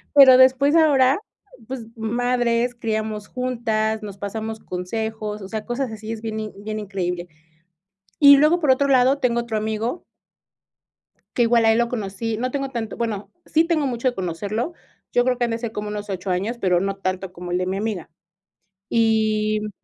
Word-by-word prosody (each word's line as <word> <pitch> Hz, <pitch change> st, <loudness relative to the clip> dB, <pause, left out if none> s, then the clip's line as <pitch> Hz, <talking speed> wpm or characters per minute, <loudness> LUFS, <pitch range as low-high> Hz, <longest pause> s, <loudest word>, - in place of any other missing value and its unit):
pero 265 Hz, -3 st, +9 dB
después 260 Hz, +3 st, +5 dB
ahora, 280 Hz, -4 st, +4 dB, 0.5 s
pues, 255 Hz, -3 st, -6 dB
madres, 240 Hz, +1 st, 0 dB
criamos 215 Hz, -2 st, -3 dB
juntas, 225 Hz, -4 st, -1 dB
nos 200 Hz, -2 st, -7 dB
pasamos 220 Hz, +2 st, -5 dB
consejos, 215 Hz, +3 st, -4 dB
o 195 Hz, -, -7 dB
sea, 215 Hz, 0 st, -4 dB
cosas 245 Hz, 0 st, -2 dB
así 220 Hz, 0 st, -7 dB
es 225 Hz, -1 st, -5 dB
bien 220 Hz, -1 st, -4 dB
in 215 Hz, -1 st, -5 dB
bien 215 Hz, 0 st, -4 dB
increíble. 180 Hz, -4 st, -3 dB, 0.9 s
Y 280 Hz, -1 st, +9 dB
luego, 305 Hz, +5 st, +4 dB
por 300 Hz, -5 st, +3 dB
otro 280 Hz, +2 st, +2 dB
lado, 265 Hz, 0 st, +4 dB
tengo 235 Hz, -2 st, +1 dB
otro 235 Hz, -2 st, -3 dB
amigo 220 Hz, +8 st, -2 dB, 1.3 s
que 245 Hz, -, +3 dB
igual 235 Hz, 0 st, +4 dB
a 225 Hz, -, +6 dB
él 225 Hz, -, +2 dB
lo 235 Hz, 0 st, +2 dB
conocí. 220 Hz, -1 st, -3 dB
No 250 Hz, +3 st, -2 dB
tengo 275 Hz, 0 st, -2 dB
tanto, 235 Hz, -4 st, -4 dB
bueno, 215 Hz, -3 st, -3 dB, 0.2 s
sí 320 Hz, +1 st, +3 dB
tengo 325 Hz, -4 st, +1 dB
mucho 245 Hz, 0 st, 0 dB
de 250 Hz, -, -2 dB
conocerlo, 200 Hz, -, -3 dB, 0.4 s
yo 245 Hz, -, +3 dB
creo 250 Hz, -1 st, +1 dB
que 245 Hz, -, +1 dB
han 235 Hz, -, -1 dB
de 230 Hz, -, -1 dB
ser 230 Hz, -1 st, -5 dB
como 210 Hz, -1 st, -4 dB
unos 210 Hz, 0 st, -5 dB
8 190 Hz, 0 st, -4 dB
años, 200 Hz, +7 st, -1 dB
pero, 180 Hz, -2 st, +2 dB
no 195 Hz, +1 st, -2 dB
tanto 185 Hz, -1 st, -3 dB
como 180 Hz, -1 st, -8 dB
el 180 Hz, -, +1 dB
de 180 Hz, -, -1 dB
mi 190 Hz, +1 st, -2 dB
amiga. 205 Hz, -6 st, -3 dB, 0.8 s
Y, 215 Hz, -2 st, +2 dB
mm 210 Hz, -, -4 dB
225 Hz, 190 wpm, -22 LUFS, 210-250 Hz, 1.3 s, pero